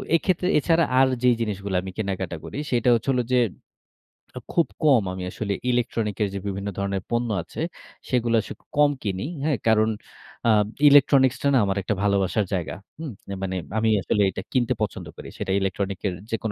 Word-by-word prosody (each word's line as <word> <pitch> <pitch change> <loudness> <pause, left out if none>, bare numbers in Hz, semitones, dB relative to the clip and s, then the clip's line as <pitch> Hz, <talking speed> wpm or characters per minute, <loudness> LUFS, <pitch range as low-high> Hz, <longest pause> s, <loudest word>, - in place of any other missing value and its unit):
এক্ষেত্রে 180 +1 +1
এছাড়া 165 +3 +3 0.2
আর, 135 - +6 0.2
যে 125 - +6
জিনিসগুলা 100 -3 -2
আমি 95 - -7
কেনাকাটা 95 -4 -3
করি, - - -7
সেটা 125 0 +2
হচ্ছে 115 +4 -2
হলো 125 -2 +1
যে, 125 - +5 1.0
আ - - -3
খুব 170 - +3 0.2
কম 135 -8 +5 0.3
আসলে 100 -2 -3 0.2
ইলেকট্রনিক 115 -3 -1
এর - - +1
যে 100 - -3
বিভিন্ন 100 +1 -3
ধরণের 100 -1 -2
পণ্য 120 0 0
আছে, 85 - -7 0.5
সেগুলা 120 -2 +2
আসলে - - -8 0.2
কম 145 0 +6
কিনি। 95 0 -2 0.2
হ্যাঁ, 150 -3 +1
কারণ 110 0 +4 0.6
আ - - +7 0.4
ইলেকট্রনিক্সটা 140 -1 +5
না - - +5
আমার 95 0 -1
একটা 105 +2 -1
ভালোবাসার 100 0 +1
জায়গা। 90 -4 -2 0.2
হুম, 160 -4 -5 0.3
মানে 95 -1 -2 0.2
আমি 110 0 +2
আসলে 105 - +1
এটা 95 - -5
কিনতে 125 -1 +2
পছন্দ 105 - -2
করি। - - -9
সেটা 95 - -3
ইলেকট্রনিক্স 95 0 -2
এর 95 - -1 0.2
যেকোন 110 -1 -2
110 Hz, 175 wpm, -24 LUFS, 100-130 Hz, 1.0 s, আ